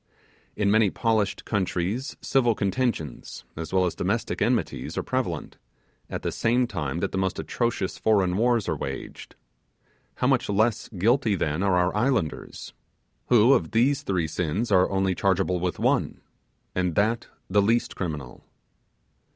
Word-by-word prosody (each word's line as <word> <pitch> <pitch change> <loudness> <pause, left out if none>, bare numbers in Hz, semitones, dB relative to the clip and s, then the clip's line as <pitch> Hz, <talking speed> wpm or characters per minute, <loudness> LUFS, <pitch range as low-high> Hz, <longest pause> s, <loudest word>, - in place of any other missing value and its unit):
In 100 -1 +1
many 110 -1 +4
polished 110 -1 0
countries 100 - -2
civil 120 -4 +2
contentions, 100 - -2
as 80 0 -6
well 95 -1 +3
as 90 - -1
domestic - - -2
enmities, - - -1
are - - 0
prevalent, - - -3 0.5
and - - -3
the - - -1
same 120 +2 +2
time 85 - -3
that 100 - -1
the 95 - -2
most 95 -1 -1
atrocious 115 -6 -2
foreign 95 -5 +2
wars 115 0 +2
are - - 0
waged. 70 0 -7 0.8
How - - -1
much - - +2
less 110 +3 +1
guilty, 110 +3 +2
then, 80 -1 -1
are 95 -2 +2
our 90 +1 +1
islanders, 115 - -1 0.5
who 120 +2 +6
of 85 -5 0
these 130 +5 +3
three 90 -4 -1
sins 90 +8 -2
are 95 -2 +4
only 95 -1 +1
chargeable 95 -1 +1
with 90 0 -2
one, - - 0 0.5
and 90 -3 -1
that 115 +3 +1 0.2
the 100 +2 +3
least 115 +4 +1
criminal! 75 -8 -5
100 Hz, 150 wpm, -25 LUFS, 90-115 Hz, 0.8 s, who